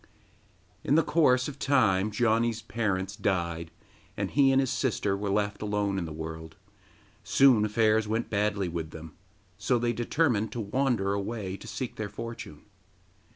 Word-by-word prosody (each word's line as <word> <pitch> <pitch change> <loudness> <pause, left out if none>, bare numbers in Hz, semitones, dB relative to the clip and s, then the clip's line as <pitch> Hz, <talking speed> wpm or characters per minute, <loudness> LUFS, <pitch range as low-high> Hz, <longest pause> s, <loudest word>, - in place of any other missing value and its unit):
In 145 - +2
the 165 - +5
course 130 -7 +3
of 145 -1 -8
time 110 -9 +2
Janni's 115 +1 +1
parents 100 -4 -2
died, 85 -5 -1 0.5
and - - -2
he 135 -2 +4
and 135 - +4
his 135 -2 +1
sister 105 -6 0
were 100 +1 -3
left 105 +1 -1
alone 105 -2 -1
in 85 - -3
the 80 - -7
world; 80 0 -7 0.7
soon 130 -6 +5
affairs 110 0 +2
went 110 +2 -1
badly 100 -2 0
with 85 -2 -4
them, 80 0 -10 0.4
so 125 - +1
they 120 0 0
determined 120 -2 0
to 120 - -4
wander 110 -2 0
away 100 -1 -3
to - - -11
seek 130 -3 -5
their 110 -1 -4
fortune. 115 +2 -8
105 Hz, 155 wpm, -28 LUFS, 95-120 Hz, 0.7 s, the